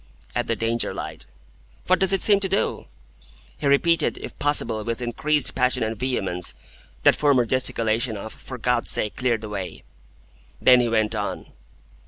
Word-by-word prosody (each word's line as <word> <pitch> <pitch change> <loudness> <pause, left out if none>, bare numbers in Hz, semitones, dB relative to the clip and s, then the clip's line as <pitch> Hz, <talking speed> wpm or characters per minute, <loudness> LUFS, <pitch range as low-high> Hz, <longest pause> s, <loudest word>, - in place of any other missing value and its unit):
"At - - -2
the 115 - 0
Danger 115 +2 -1
light." - - -6 0.6
"What 185 - +3
does 190 -1 +3
it 195 - +3
seem 205 -2 +6
to 195 -1 -1
do?" - - -1 0.7
He 145 - -1
repeated, 165 +4 +2
if - - -9
possible 140 -7 0
with 115 +1 -3
increased 145 +5 +1
passion 125 -2 +1
and 110 +1 -2
vehemence, 95 -7 -2 0.5
that - - +6
former 140 -5 +3
gesticulation 115 -2 0
of, 110 +2 -8
"For 130 - -9
God's 125 0 0
sake, 105 - 0
clear 125 -3 +1
the 110 0 -8
way!" 95 -5 -6 0.8
Then 125 -1 +6
he 120 -1 +1
went 110 -1 +1
on. 105 -2 -4
120 Hz, 165 wpm, -23 LUFS, 110-140 Hz, 0.8 s, seem